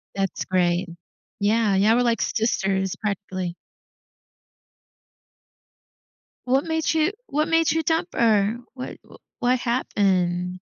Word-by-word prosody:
That's 195 Hz, -1 st, -2 dB
great. 180 Hz, 0 st, +1 dB, 0.5 s
Yeah, 210 Hz, 0 st, +2 dB
yeah, 205 Hz, +3 st, +4 dB
we're 245 Hz, -, +3 dB
like 230 Hz, -4 st, +1 dB
sisters, 195 Hz, -4 st, 0 dB
practically. 185 Hz, -4 st, -4 dB, 2.9 s
What 265 Hz, +3 st, +2 dB
made 320 Hz, -1 st, 0 dB
you 320 Hz, +4 st, +2 dB
what 305 Hz, -3 st, 0 dB
made 325 Hz, -1 st, +3 dB
you 325 Hz, 0 st, 0 dB
dump 325 Hz, +2 st, 0 dB
her? 215 Hz, -1 st, +2 dB, 0.2 s
What 255 Hz, -1 st, -8 dB
w -, -, -16 dB, 0.2 s
what 250 Hz, +1 st, +2 dB
happened? 185 Hz, -7 st, 0 dB
215 Hz, 110 wpm, -24 LUFS, 190-255 Hz, 2.9 s, yeah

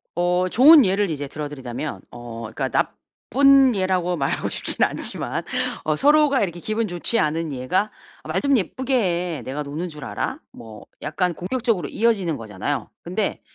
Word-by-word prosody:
어 180 Hz, +1 st, +1 dB
좋은 280 Hz, -, +8 dB
예를 195 Hz, +1 st, +1 dB
이제 145 Hz, -3 st, -3 dB
들어드리자면 145 Hz, -2 st, -6 dB
어 120 Hz, -1 st, -8 dB
그니까 -, -, -3 dB
나쁜 275 Hz, -1 st, +3 dB
예라고 185 Hz, -2 st, 0 dB
말하고 135 Hz, -2 st, -1 dB
싶진 -, -, +1 dB
않지만 -, -, -2 dB, 0.4 s
어 155 Hz, -, +1 dB
서로가 295 Hz, -, +4 dB
이렇게 175 Hz, -3 st, -3 dB
기분 215 Hz, +4 st, -2 dB
좋지 175 Hz, +5 st, -1 dB
않은 155 Hz, 0 st, -1 dB
예가 135 Hz, +12 st, -1 dB, 0.3 s
"아 -, -, -11 dB
말 -, -, 0 dB
좀 280 Hz, -2 st, +3 dB
예쁘게 260 Hz, +7 st, -3 dB, 0.4 s
해. -, -, -8 dB
내가 145 Hz, +3 st, -4 dB
노는 150 Hz, +5 st, -4 dB
줄 150 Hz, -3 st, -10 dB
알아?" -, -, -3 dB
뭐 110 Hz, -3 st, -12 dB, 0.2 s
약간 175 Hz, +4 st, -1 dB
공격적으로 215 Hz, -, -1 dB
이어지는 200 Hz, -9 st, +1 dB
거잖아요. 110 Hz, +3 st, -4 dB
근데 195 Hz, +4 st, -2 dB
175 Hz, 340 characters per minute, -22 LUFS, 145-220 Hz, 0.4 s, 좋은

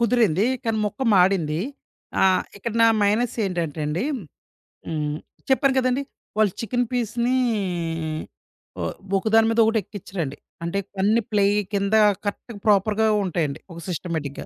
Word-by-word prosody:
కుదిరింది. 230 Hz, -5 st, +3 dB, 0.2 s
కానీ 225 Hz, -1 st, 0 dB
మొక్కం 250 Hz, +4 st, -2 dB
మాడింది. 180 Hz, -4 st, +3 dB, 0.6 s
ఆహ్, 190 Hz, -1 st, +4 dB
ఇక్కడ 220 Hz, +2 st, -4 dB
నా -, -, +8 dB, 0.2 s
మైనస్ 215 Hz, +4 st, +2 dB
ఏంటంటే 170 Hz, -5 st, -2 dB
అండి, 165 Hz, -, -1 dB, 0.8 s
హ్మ్. 150 Hz, -2 st, -2 dB, 0.3 s
చెప్పాను 265 Hz, 0 st, +3 dB
కదండీ! 255 Hz, +1 st, +2 dB, 0.3 s
వాళ్ళ 215 Hz, -2 st, +4 dB
చికెను 245 Hz, +2 st, 0 dB
పీసుని, 240 Hz, +1 st, 0 dB, 1.4 s
ఓ -, -, -2 dB, 0.4 s
ఒక 190 Hz, -, -3 dB
దాని 225 Hz, 0 st, +6 dB
మీద 225 Hz, -, +1 dB
ఒకటి 225 Hz, 0 st, +2 dB
ఎక్కిచ్చరండి. 175 Hz, -7 st, -5 dB, 0.3 s
అంటే 170 Hz, +4 st, -1 dB, 0.2 s
కొన్ని 210 Hz, +4 st, +3 dB
ప్లేయ్ 205 Hz, 0 st, +3 dB, 0.2 s
కింద 200 Hz, +1 st, 0 dB, 0.3 s
కరెక్ట్‌గా 205 Hz, +2 st, -5 dB
ప్రాపర్‌గా 210 Hz, +2 st, +3 dB, 0.2 s
ఉంటాయండి. 165 Hz, -6 st, -1 dB
ఒక 170 Hz, -, -9 dB
సిస్టమేటిక్‌గా. 160 Hz, -5 st, -4 dB
205 Hz, 130 wpm, -23 LUFS, 175-230 Hz, 1.4 s, నా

